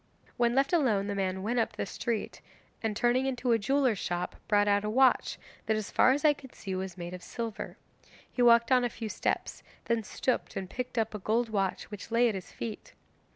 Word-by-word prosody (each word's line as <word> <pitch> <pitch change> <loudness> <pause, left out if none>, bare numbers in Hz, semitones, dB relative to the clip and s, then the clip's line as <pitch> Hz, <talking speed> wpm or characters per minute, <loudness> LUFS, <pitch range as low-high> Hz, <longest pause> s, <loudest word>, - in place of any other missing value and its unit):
'When 240 -1 +2
left 275 +4 +2
alone 235 - +3
the 205 - -2
man 190 -1 -1
went 240 +4 0
up 225 - 0
the - - -3
street, 225 +2 -3 0.4
and 220 -2 -1
turning 250 +2 +2
into 255 -1 0
a 230 - +4
jeweller's 260 -2 +2
shop, 175 0 -3
brought 205 -1 +3
out 205 0 +3
a 210 - -1
watch 260 +3 +3 0.3
that 220 - +2
as 215 - -4
far - - +5
as 285 +3 0
I 300 - +7
could 265 -3 -14
see 195 - -5
was 185 0 -4
made 175 0 -6
of 180 - -7
silver. 230 +1 -5 0.5
He 250 - -2
walked 235 0 +6
on 250 -1 +5
a 245 - +1
few 225 -1 -6
steps, - - -2 0.2
then 230 -1 +1
stooped 250 +3 -2
and 190 -1 -3
picked 250 +5 -5
up 225 -1 0
a 210 - -4
gold 225 +4 0
watch 195 -1 -1
which 210 +1 -8
lay 235 +1 +4
at 225 - 0
his 190 -2 -7
feet. 230 - -7
225 Hz, 220 wpm, -30 LUFS, 200-245 Hz, 0.5 s, I